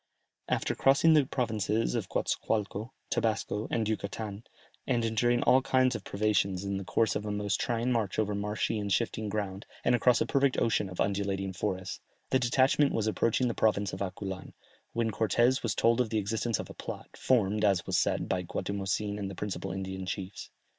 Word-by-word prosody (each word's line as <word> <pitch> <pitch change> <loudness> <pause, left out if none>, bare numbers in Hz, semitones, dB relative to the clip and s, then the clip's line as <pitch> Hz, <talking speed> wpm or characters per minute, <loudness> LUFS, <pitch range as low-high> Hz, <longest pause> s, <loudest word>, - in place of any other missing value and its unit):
After - - 0
crossing 140 +4 +5
the 150 -4 +4
provinces 110 - 0
of - - -2
Goatzacoalco, 105 +1 -1 0.2
Tabasco, 110 -1 0
and 110 -2 0
Yucatan, 105 0 -4 0.4
and 120 -3 +1
enduring 120 +2 +2
all 130 +1 +5
kinds 130 -1 +3
of 110 - -5
privations 100 -2 0
in 100 0 -2
the 95 - -4
course 110 +3 +1
of - - -2
a 105 - -3
most 105 -1 -1
trying 120 0 0
march 110 -6 0
over 105 -1 +1
marshy 105 +2 -1
and 100 -1 -3
shifting 110 -1 0
ground, 100 -1 -4 0.2
and - - +4
across 125 0 +4
a - - +1
perfect 140 -1 +2
ocean 105 -3 +1
of 90 - -10
undulating 95 -1 -1
forests, 95 0 -3 0.3
the 130 - +4
detachment 130 +3 +3
was 110 - 0
approaching 115 +3 +1
the 120 - 0
province 105 -4 +1
of 95 - -6
Aculan, 95 0 -5 0.4
when 115 -1 0
Cortès 120 +5 +2
was 110 -4 -1
told 115 +2 +3
of 120 - -1
the 110 - 0
existence 110 +2 0
of - - -6
a - - -9
plot, - - -7
formed, 105 -4 +2
as 95 -4 +3
was - - +1
said, - - 0
by 90 - 0
Guatimozin 100 +3 -2
and 100 -1 -3
the 100 - -7
principal 95 -1 -4
Indian 95 0 -5
chiefs. 95 +1 -5
105 Hz, 190 wpm, -30 LUFS, 100-115 Hz, 0.4 s, crossing